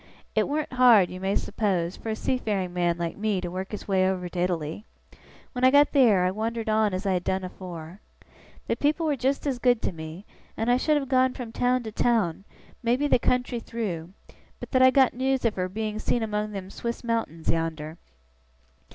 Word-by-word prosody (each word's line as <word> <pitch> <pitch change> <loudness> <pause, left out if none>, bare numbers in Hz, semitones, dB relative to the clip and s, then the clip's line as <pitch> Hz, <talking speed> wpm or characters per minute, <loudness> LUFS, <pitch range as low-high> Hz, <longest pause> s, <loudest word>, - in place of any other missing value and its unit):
It - - +2
warn't 300 -1 -2
hard, 240 -7 +6
you 185 - -7
may 195 +1 -1
suppose, 190 -5 -1
for 225 - -7
a 220 - -1
seafaring 210 -7 -1
man 175 -1 +1
like 170 -1 -3
me 210 -2 0
to 175 -1 -5
work 185 +1 -4
his 210 - -7
way 190 -1 +3
over 180 -1 -2
to 175 - -5
Italy. 175 0 -2 0.7
When 250 -1 -4
I 255 - +8
got 285 +2 +5
theer, 225 -10 +4
I 185 - +2
wandered 225 +2 -3
on 215 -1 +2
as 185 +2 -4
I 195 - +2
had 180 -1 -1
done 190 0 -1
afore. 180 -1 -8 0.7
The - - 0
people 305 +3 +1
was 290 -4 0
just 270 +4 0
as 265 -4 -1
good 245 -2 +3
to - - 0
me, 160 +3 -9 0.3
and 225 +2 +1
I 245 - +4
should 300 +3 +2
have 275 -2 -2
gone 260 -1 +2
from 240 -3 -6
town 250 +1 +1
to 220 - -6
town, 210 -6 0 0.4
maybe 245 +4 +1
the 285 - +3
country 250 0 0
through, 185 -8 -5 0.5
but - - -8
that 255 - +3
I 260 - +8
got 265 -1 +4
news 265 0 0
of 225 - +2
her 185 -2 -2
being 215 +2 -3
seen 235 +1 0
among 210 -1 -2
them 195 -1 -7
Swiss 235 +1 -5
mountains 225 -9 -1
yonder. 160 -1 -3
215 Hz, 210 wpm, -26 LUFS, 185-250 Hz, 0.7 s, I